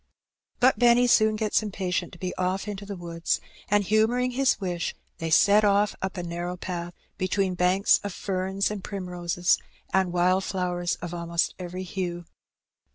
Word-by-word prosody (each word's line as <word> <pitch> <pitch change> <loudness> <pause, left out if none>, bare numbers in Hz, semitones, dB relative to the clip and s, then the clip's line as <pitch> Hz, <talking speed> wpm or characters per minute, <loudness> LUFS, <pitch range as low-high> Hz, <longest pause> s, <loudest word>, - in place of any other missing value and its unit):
But 255 +2 +4
Benny 240 0 +5
soon 220 -3 +4
gets 215 0 +1
impatient 190 -4 -2
to - - -10
be 185 -1 -4
off 185 +3 -1
into 200 -1 -6
the 200 - -5
woods, 170 -2 -2 0.3
and, 205 0 +3
humouring 225 +5 +2
his 265 +1 +2
wish, 175 -3 -3 0.2
they 165 - -2
set 205 +6 +5
off 205 0 +3
up 190 +1 -3
a 175 - -3
narrow 175 +1 -4
path, 175 -1 -5 0.2
between 185 0 0
banks 180 +3 +3
of 205 - -3
ferns 190 +2 -1
and 205 -3 -5
primroses 180 -2 0 0.3
and 190 -2 +2
wild 180 +2 +2
flowers 180 -2 -1
of 175 -1 -5
almost 170 -1 -1
every 180 +1 -5
hue. 175 -2 -4
185 Hz, 160 wpm, -26 LUFS, 175-205 Hz, 0.3 s, Benny